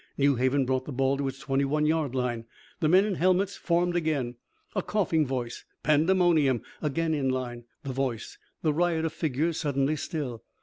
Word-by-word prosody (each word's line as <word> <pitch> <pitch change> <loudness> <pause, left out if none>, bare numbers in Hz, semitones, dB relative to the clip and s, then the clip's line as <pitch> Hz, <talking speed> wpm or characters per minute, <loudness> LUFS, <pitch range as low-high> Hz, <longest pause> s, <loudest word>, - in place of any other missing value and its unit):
New 140 0 +4
Haven 130 +2 +2
brought 130 0 0
the - - -6
ball 135 +1 +1
to 140 -1 -1
its 135 0 -4
twenty 135 -1 0
one 150 +2 +1
yard 155 -4 +1
line. 120 -3 -1 0.3
The 155 -4 +2
men 185 +4 +6
in 210 - -1
helmets 185 +3 +2
formed 175 0 +1
again. 150 -8 0 0.4
A 195 - +1
coughing 170 -8 +1
voice. 125 -3 -4 0.2
Pandemonium. 155 -4 +3 0.2
Again 160 +2 0
in 140 -3 0
line. 120 -2 -3 0.2
The 135 -2 -4
voice. 125 -3 -3 0.2
The 155 -2 +2
riot 165 0 +1
of 160 - -2
figures 160 +2 -1
suddenly 140 0 +1
still. 140 - -4
145 Hz, 180 wpm, -28 LUFS, 130-165 Hz, 0.4 s, men